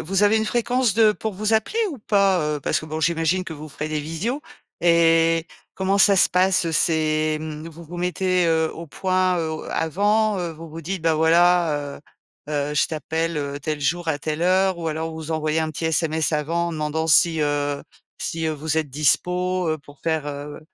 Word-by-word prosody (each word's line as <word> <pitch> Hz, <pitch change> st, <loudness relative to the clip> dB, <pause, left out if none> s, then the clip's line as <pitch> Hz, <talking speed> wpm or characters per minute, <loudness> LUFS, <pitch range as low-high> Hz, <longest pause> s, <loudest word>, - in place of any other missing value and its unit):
vous 195 Hz, +4 st, 0 dB
avez 205 Hz, +2 st, +4 dB
une 220 Hz, -, -1 dB
fréquence 245 Hz, -1 st, +1 dB
de 220 Hz, -2 st, +5 dB
pour 215 Hz, -1 st, -5 dB
vous 215 Hz, +3 st, -1 dB
appeler 220 Hz, -, +1 dB
ou 280 Hz, -, -7 dB
pas, 195 Hz, -7 st, +2 dB
heu? -, -, -8 dB
Parce -, -, 0 dB
que 155 Hz, -, -9 dB
bon 155 Hz, 0 st, -4 dB
j'imagine 165 Hz, +3 st, +1 dB
que 160 Hz, -, -7 dB
vous 155 Hz, 0 st, -9 dB
ferez 150 Hz, +2 st, -5 dB
des 155 Hz, -, -1 dB
visios 165 Hz, -, -3 dB, 0.4 s
et 165 Hz, -1 st, +4 dB, 0.3 s
comment 195 Hz, +1 st, 0 dB
ça 200 Hz, 0 st, +5 dB
se -, -, +4 dB
passe, 185 Hz, 0 st, +3 dB
heu 165 Hz, -, -2 dB
c'est 155 Hz, -1 st, +1 dB
hem 155 Hz, +1 st, -6 dB
vous 165 Hz, +1 st, -12 dB
vous 175 Hz, +2 st, -8 dB
mettez, 180 Hz, 0 st, +1 dB
heu, 160 Hz, -1 st, +2 dB
au 165 Hz, 0 st, -8 dB
point, 185 Hz, +2 st, 0 dB
heu, 160 Hz, -1 st, -2 dB
au 155 Hz, -, -5 dB
avant, 205 Hz, +5 st, +1 dB
heu, 175 Hz, -2 st, -3 dB
vous 160 Hz, 0 st, -11 dB
vous 165 Hz, +1 st, -7 dB
dites: 180 Hz, +1 st, -4 dB
«bah, 165 Hz, -1 st, +3 dB
voilà, 160 Hz, -3 st, +2 dB
heu, -, -, -19 dB, 0.5 s
heu, 145 Hz, -1 st, -1 dB
je -, -, +3 dB
t'appelle, 160 Hz, +1 st, -3 dB
heu, 140 Hz, 0 st, -3 dB
tel 155 Hz, 0 st, -3 dB
jour 165 Hz, +4 st, -1 dB
à 145 Hz, -, 0 dB
telle 155 Hz, +2 st, -3 dB
heure?» 185 Hz, 0 st, +2 dB
ou 165 Hz, -, -2 dB
alors 160 Hz, +1 st, -3 dB
vous 160 Hz, 0 st, -7 dB
envoyer 155 Hz, 0 st, 0 dB
un 160 Hz, 0 st, -1 dB
petit 160 Hz, +2 st, -6 dB
SMS 160 Hz, -1 st, 0 dB
avant 165 Hz, +3 st, 0 dB
en -, -, -5 dB
demandant 155 Hz, +1 st, -2 dB
si, 160 Hz, 0 st, +4 dB
heu 145 Hz, -1 st, -1 dB, 0.4 s
si, 165 Hz, -1 st, -3 dB
heu, 155 Hz, -, 0 dB
vous 155 Hz, +2 st, -1 dB
êtes 155 Hz, -, -2 dB
dispo, 180 Hz, +5 st, +1 dB
heu, 155 Hz, -, 0 dB
pour 145 Hz, 0 st, -17 dB
faire, 160 Hz, -2 st, -1 dB
heu, 145 Hz, +1 st, -6 dB
165 Hz, 215 wpm, -22 LUFS, 155-185 Hz, 0.5 s, de